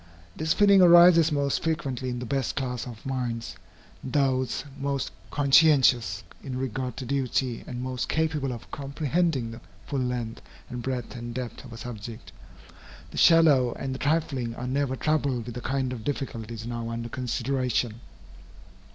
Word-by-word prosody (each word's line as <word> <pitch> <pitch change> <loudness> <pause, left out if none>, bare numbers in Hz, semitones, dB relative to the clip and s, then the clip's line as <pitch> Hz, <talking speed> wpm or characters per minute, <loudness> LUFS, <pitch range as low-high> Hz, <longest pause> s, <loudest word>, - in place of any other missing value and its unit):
This 155 0 -1
feeling 200 -2 +6
arises 170 -2 +8
most 140 -2 0
frequently 140 -6 -2
in 125 - -3
the 125 - -5
best 135 +1 -1
class 125 -3 -3
of 115 -3 -10
minds, 125 -3 -3 0.5
those 130 -1 0
most 140 -4 -2 0.2
conscientious 130 -8 +4 0.2
in 130 -3 -4
regard 130 -1 -3
to 130 - -5
duty 130 -2 -1
and 125 0 -5
most 130 -1 -3
capable 155 -4 0
of 120 - -8
comprehending 140 -2 -1
the 115 +1 -10 0.2
full 140 -2 -2
length 125 -3 -3 0.3
and 120 0 -4
breadth 125 -1 -4
and 120 -1 -6
depth 125 -2 -5
of 120 - -11
a 115 - -8
subject. 115 - -8 0.8
The - - -9
shallow 150 -7 +6
and 135 -1 -4
the 130 - -6
trifling 140 -6 0
are 125 - -5
never 130 +1 0
troubled 140 -5 0
with 120 - -6
the 125 - -6
kind 130 -1 -1
of 115 -3 -7
difficulties 115 -5 -4
now 115 -1 -4
under 115 0 -4
consideration. 125 -1 -1
130 Hz, 155 wpm, -27 LUFS, 120-140 Hz, 0.8 s, arises